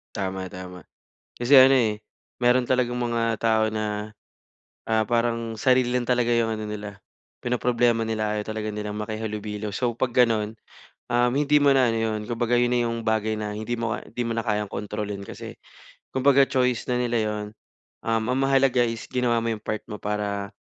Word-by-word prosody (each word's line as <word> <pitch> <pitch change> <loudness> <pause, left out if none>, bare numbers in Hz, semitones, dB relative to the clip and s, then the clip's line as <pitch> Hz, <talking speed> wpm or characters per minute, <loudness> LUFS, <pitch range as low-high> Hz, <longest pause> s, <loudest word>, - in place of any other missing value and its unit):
Tama, 95 -2 -3
tama. 90 -2 -9 0.6
Kasi 120 +4 +5
ano, 130 0 +9
eh, 110 -5 +2 0.4
meron 125 0 +4
talagang 125 -1 +1
mga 115 -2 0
tao 110 -1 +2
na, 105 0 -3 0.8
ah, 110 -1 +2
parang 115 -1 -1
sarili 125 +1 +3
lang 125 -1 0
talaga 125 -1 +2
yung 115 -1 +2
ano 110 - -5
nila 105 -1 -7 0.4
pinoproblema 120 -2 +1
nila, 110 -1 -1
ayaw 105 - -4
talaga 110 0 -3
nilang 105 0 -5
makihalubilo. 105 -1 -4
So 120 -1 -1
pag 125 -2 -1
ganon, 110 -3 +2 0.5
um, 120 0 +2
hindi 145 +2 +2
mo 145 -1 +5
na 130 -2 +4
ano 115 - 0
yun, 110 -1 -1
kumbaga 120 0 -1
yun 120 0 +4
na 120 -1 +1
yung 115 0 -2
bagay 110 -1 0
na 105 -1 -3
hindi 115 +2 -3
mo 115 -1 -1
ka - - -9
hindi 120 - -2
mo 115 - -2
na 115 - -1
kayang 105 -2 -1
kontrolin, 100 0 -5
kasi - - -9 0.5
kumbaga 140 +1 +4
choice 125 -2 0
na 125 - +1
nila 120 -1 0
yun. 105 0 -4 0.6
Um, 115 0 0
ang 125 - +1
mahalaga 135 -2 +3
is 115 -1 -5
ginawa 125 -2 +1
mo 115 - -1
yung 105 - -22
part 110 - -2
mo 105 - -5
para 100 -1 -3
115 Hz, 185 wpm, -25 LUFS, 105-120 Hz, 0.8 s, ano